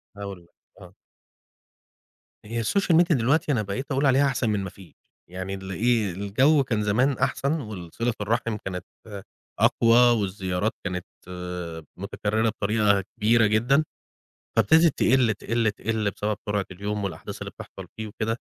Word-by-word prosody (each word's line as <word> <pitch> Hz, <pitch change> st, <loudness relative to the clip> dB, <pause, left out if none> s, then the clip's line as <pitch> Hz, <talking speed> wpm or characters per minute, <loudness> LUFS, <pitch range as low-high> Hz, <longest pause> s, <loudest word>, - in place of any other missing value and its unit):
هاقول 100 Hz, -3 st, -7 dB
لك، 85 Hz, -, -26 dB, 0.3 s
آه. -, -, -13 dB, 1.5 s
هي 115 Hz, +2 st, -3 dB
الsocial 185 Hz, -, +2 dB
media 170 Hz, -2 st, +3 dB
دلوقتي 140 Hz, +6 st, +2 dB
أنا 115 Hz, -6 st, +1 dB
بقيت 115 Hz, +8 st, -5 dB
أقول 135 Hz, +2 st, +1 dB
عليها 135 Hz, +1 st, +4 dB
أحسن 130 Hz, -4 st, 0 dB
من 105 Hz, -, +1 dB
ما 95 Hz, -, -4 dB
فيش، 95 Hz, -1 st, -16 dB, 0.4 s
يعني 95 Hz, +2 st, -5 dB
الإيه 100 Hz, +2 st, 0 dB
الجو 125 Hz, -, +3 dB
كان 115 Hz, -5 st, -1 dB
زمان 125 Hz, +7 st, +2 dB
أحسن، 140 Hz, +3 st, 0 dB
والصِلة 105 Hz, +2 st, -4 dB
الرَحِم 115 Hz, +1 st, -1 dB
كانت 90 Hz, -1 st, -4 dB, 0.7 s
أقوى، 115 Hz, 0 st, +4 dB, 0.2 s
والزيارات 95 Hz, +1 st, -1 dB
كانت 90 Hz, -2 st, -3 dB, 0.9 s
متُكررة 105 Hz, +3 st, -1 dB
بطريقة 105 Hz, -2 st, +1 dB
كبيرة 115 Hz, +2 st, +4 dB
جدًا. 120 Hz, +8 st, +3 dB, 0.7 s
فابتدت 155 Hz, -, +4 dB
تقِل 125 Hz, -2 st, +4 dB
تقِل 115 Hz, +1 st, 0 dB
تقِل 110 Hz, -1 st, -2 dB
بسبب 105 Hz, 0 st, -2 dB
سرعة 105 Hz, -2 st, -1 dB
اليوم 100 Hz, +3 st, -4 dB
والأحداث 95 Hz, -, -6 dB
اللي -, -, -5 dB
بتحصل -, -, -10 dB
فيه 110 Hz, 0 st, -4 dB
وكده، 110 Hz, +2 st, -3 dB
110 Hz, 140 wpm, -25 LUFS, 100-120 Hz, 1.5 s, عليها